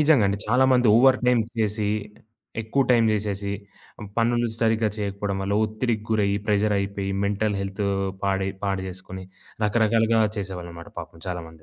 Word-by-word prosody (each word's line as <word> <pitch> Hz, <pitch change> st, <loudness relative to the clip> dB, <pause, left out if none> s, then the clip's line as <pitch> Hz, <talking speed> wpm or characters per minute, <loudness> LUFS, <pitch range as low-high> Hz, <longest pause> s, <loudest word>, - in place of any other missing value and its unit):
నిజంగా 145 Hz, -7 st, +5 dB
అండి. 100 Hz, -, -1 dB
చాలా 130 Hz, +3 st, +4 dB
మంది 125 Hz, -2 st, +4 dB
ఓవర్ 130 Hz, +1 st, +6 dB
టైమ్ 120 Hz, -2 st, +4 dB, 0.2 s
చేసి 105 Hz, -1 st, 0 dB, 0.7 s
ఎక్కువ 135 Hz, +6 st, +1 dB
టైం 115 Hz, -2 st, +5 dB
జేసేసి, 100 Hz, -1 st, -2 dB, 0.7 s
పనులు 120 Hz, +1 st, +2 dB
సరిగ్గా 110 Hz, -1 st, +2 dB
చేయకపోవడం 100 Hz, -1 st, -2 dB
వల్ల 100 Hz, +1 st, -1 dB
ఒత్తిడికి 110 Hz, 0 st, -2 dB
గురయ్యి, 100 Hz, -2 st, +2 dB
ప్రెషర్ 105 Hz, 0 st, +2 dB
అయిపోయి, 100 Hz, 0 st, -3 dB, 0.2 s
మెంటల్ 105 Hz, 0 st, 0 dB
హెల్తు 100 Hz, +1 st, -3 dB, 0.4 s
పాడై 95 Hz, 0 st, 0 dB
పాడుచేసుకొని 95 Hz, -1 st, -4 dB, 0.4 s
రకరకాలుగా 110 Hz, +1 st, +3 dB, 0.2 s
చేసేవాళ్ళన్నమాట 85 Hz, -3 st, -7 dB
పాపం 80 Hz, -, -12 dB
చాలా 90 Hz, -1 st, -3 dB
మంది. 80 Hz, -1 st, -17 dB
105 Hz, 140 wpm, -24 LUFS, 95-115 Hz, 0.7 s, ఓవర్